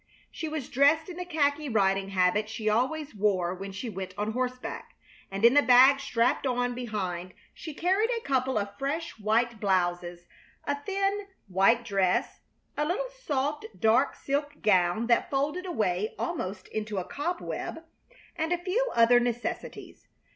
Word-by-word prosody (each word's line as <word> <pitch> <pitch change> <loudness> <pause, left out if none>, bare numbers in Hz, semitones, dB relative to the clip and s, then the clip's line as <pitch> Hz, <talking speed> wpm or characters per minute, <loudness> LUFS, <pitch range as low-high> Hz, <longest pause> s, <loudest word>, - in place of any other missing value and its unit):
She 320 - -5
was 305 -4 -4
dressed 290 +6 +3
in 350 - -8
the 360 - -4
khaki 300 -3 0
riding 195 -3 +1
habit 195 +3 +1
she 220 -1 -5
always 265 +7 0
wore 195 -4 +1
when 195 +2 -7
she 205 +6 -6
went 190 -3 -6
on 210 +1 -1
horseback; 250 +1 -4 0.3
and 195 +3 0
in 235 - +7
the 290 - +6
bag 260 +3 +7
strapped 245 +1 +1
on 245 -1 0
behind 190 -7 -4 0.2
she 315 -3 -8
carried 385 +8 +1
a 470 -2 -1
couple 260 -2 +1
of 200 -1 -3
fresh 285 -1 -3
white 225 +2 +1
blouses, 175 -3 0 0.4
a 285 - 0
thin, 395 +3 -1 0.2
white 195 +6 +3
dress, 195 -4 0 0.4
a 295 - 0
little 395 +11 -1
soft 300 - -3
dark 230 +5 +3
silk 290 +1 -3
gown 185 +1 +3
that 235 0 +2
folded 295 +7 -1
away 210 - -1
almost 195 - -4
into 215 -1 -4
a 185 - -1
cobweb, 325 - -4 0.5
and 320 0 -2
a 355 - +2
few 390 +8 -1
other 235 +1 +6
necessities. 240 -1 -4
245 Hz, 155 wpm, -28 LUFS, 200-300 Hz, 0.5 s, in